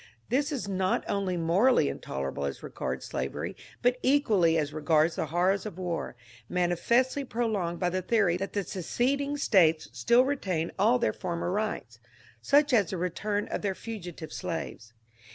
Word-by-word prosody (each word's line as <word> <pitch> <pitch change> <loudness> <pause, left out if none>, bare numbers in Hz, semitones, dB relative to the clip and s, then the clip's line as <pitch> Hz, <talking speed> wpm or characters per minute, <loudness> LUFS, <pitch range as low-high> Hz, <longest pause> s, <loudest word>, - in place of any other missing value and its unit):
This 285 +5 +1
is 265 -8 -3
not 190 -1 0
only 195 -3 -1
morally 170 - +3
intolerable 70 +1 -4
as 70 - -5
regards 65 +1 -4
slavery, - - -4 0.3
but 250 +1 +2
equaUy 210 - +3
as 150 -1 -2
regards 155 +1 +2
the - - -2
horrors 185 +4 +1
of 195 - -8
war, 175 -7 -3 0.3
manifestly 235 +10 +1
pro 240 -2 -2
longed 180 -6 -1
by 180 - +1
the 185 +1 -1
theory 195 -3 +2
that 195 +2 -4
the 200 - 0
seceding 270 - -1
States 165 - +3
still 240 +2 +4
retain 185 - -1
all 225 +5 +5
their 240 - 0
former 175 -1 -3
rights 195 - -3 0.2
— 115 - -27
such 290 -1 +5
as 205 -7 +4
the 190 - -3
return 205 +4 -2
of - - -3
their 195 -2 -1
fugitive 180 -7 -7
slaves. 165 -10 -5
185 Hz, 165 wpm, -28 LUFS, 170-235 Hz, 0.3 s, all